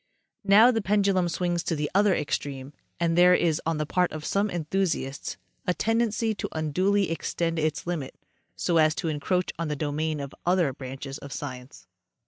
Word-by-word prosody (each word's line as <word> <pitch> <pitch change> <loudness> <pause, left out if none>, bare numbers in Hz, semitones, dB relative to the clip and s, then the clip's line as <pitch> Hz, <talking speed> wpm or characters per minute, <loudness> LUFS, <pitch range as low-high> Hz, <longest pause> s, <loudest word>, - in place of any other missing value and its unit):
Now 210 +5 +7
the 225 -2 0
pendulum 195 -2 +2
swings 175 0 -1
to 165 - -2
the 150 -1 -1
other 200 -1 +4
extreme, 140 -1 -3 0.3
and 170 -1 +1
there 180 +1 +7
is 165 -3 +1
on 165 -1 0
the 155 - -1
part 180 +4 +1
of 155 -1 -6
some 200 +1 +1
enthusiasts 170 -5 -2 0.3
a 180 - +2
tendency 225 0 +1
to 200 - -5
unduly 185 +5 +1
extend 165 0 -2
its 155 -1 -1
limit 170 -6 -4 0.4
so 170 - +1
as 155 -1 +4
to 165 - -2
encroach 175 +4 -1
on 165 - -1
the 150 - -2
domain 150 +1 -2
of 140 -1 -6
other 175 -6 +2
branches 135 +1 -7
of 140 - -9
sci 140 -3 -4
ence. 125 - -14
165 Hz, 180 wpm, -26 LUFS, 150-185 Hz, 0.4 s, Now